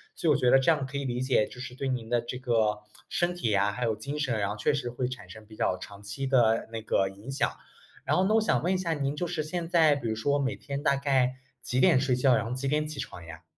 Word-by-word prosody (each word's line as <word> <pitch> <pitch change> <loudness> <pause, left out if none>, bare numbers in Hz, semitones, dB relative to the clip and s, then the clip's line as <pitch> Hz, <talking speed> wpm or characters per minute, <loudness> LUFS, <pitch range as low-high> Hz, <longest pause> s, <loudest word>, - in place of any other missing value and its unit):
所 165 - -2
以 150 - +6
我 - - +2
觉 125 -2 +3
得 135 - +7
这 135 - +2
样 155 -4 +2
可 135 +2 -5
以 140 - -3
理 125 0 -2
解， 130 -5 +2
就 125 - -10
是 125 - -7
对 135 +2 -4
您 120 -3 -3
的 120 - +2
这 120 +2 -5
个 115 -5 +1 0.3
身 175 0 0
体 145 -11 -1
呀， 100 0 +2
还 125 +3 -3
有 110 -1 +1
精 140 +7 -5
神， 130 -7 0
然 100 -1 0
后 105 - -4
确 125 - +1
实 140 -4 -2
会 125 +1 -2
产 130 0 -8
生 110 0 -11
比 110 0 -14
较 95 - 0
长 100 +2 -11
期 130 +7 -4
的 115 -4 +3
那 115 - -3
个 95 -3 +1
影 100 +7 -9
响。 135 - +1 0.6
然 - - +2
后 185 - +3
呢 215 - +3
我 225 - +5
想 215 - +1
问 180 +3 +1
一 185 - +1
下 175 -3 -2
您 140 -1 -2
就 175 - -2
是 165 -3 -2
现 170 +2 -3
在 160 -4 +5
比 120 -5 -3
如 110 - -1
说 145 +5 +1
每 135 -1 -1
天 140 +1 -5
大 140 - +3
概 135 -2 +2 0.3
几 125 - -1
点 130 - +5
睡 130 -2 +1
觉， 125 -1 +4
然 110 - 0
后 115 - -5
几 130 +2 -3
点 150 +2 +1
起 150 -2 -7
床 90 -9 -7
呀？ 80 -1 -10
130 Hz, 320 characters per minute, -28 LUFS, 115-145 Hz, 0.6 s, 得